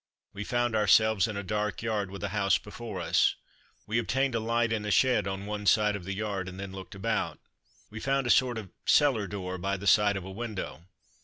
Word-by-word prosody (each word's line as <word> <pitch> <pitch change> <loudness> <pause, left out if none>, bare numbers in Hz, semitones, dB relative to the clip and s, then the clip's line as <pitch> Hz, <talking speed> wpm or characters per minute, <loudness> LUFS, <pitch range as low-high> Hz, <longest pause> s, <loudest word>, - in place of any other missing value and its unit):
We 100 - -5
found 120 +1 0
ourselves 110 -1 +4
in 105 -2 -4
a 100 - -3
dark 105 +2 -2
yard, 105 -4 -1
with 100 -1 -8
a - - -1
house 100 -2 +2
before 105 -1 -7
us. 85 - +3 0.5
We 110 +2 0
obtained 130 +3 0
a 115 - +1
light 115 +1 +1
in 110 -1 -2
a 105 - -3
shed 105 0 +3
on 95 +1 -4
one 105 0 -4
side 105 -1 +4
of 95 -4 -7
the 100 +1 -3
yard, 100 -3 -3
and 95 +1 -10
then 100 -1 -6
looked 95 0 -9
about. 115 +4 -1 0.5
We 110 - -7
found 135 +2 0
a 120 - +3
sort 125 -1 +3
of 105 -5 -7
cellar 130 -9 +3
door 95 -1 -5
by 100 +2 -1
the 100 - -8
side 105 0 +4
of 95 - -6
a 95 - -7
window. 100 -5 -6
105 Hz, 225 wpm, -29 LUFS, 95-115 Hz, 0.5 s, ourselves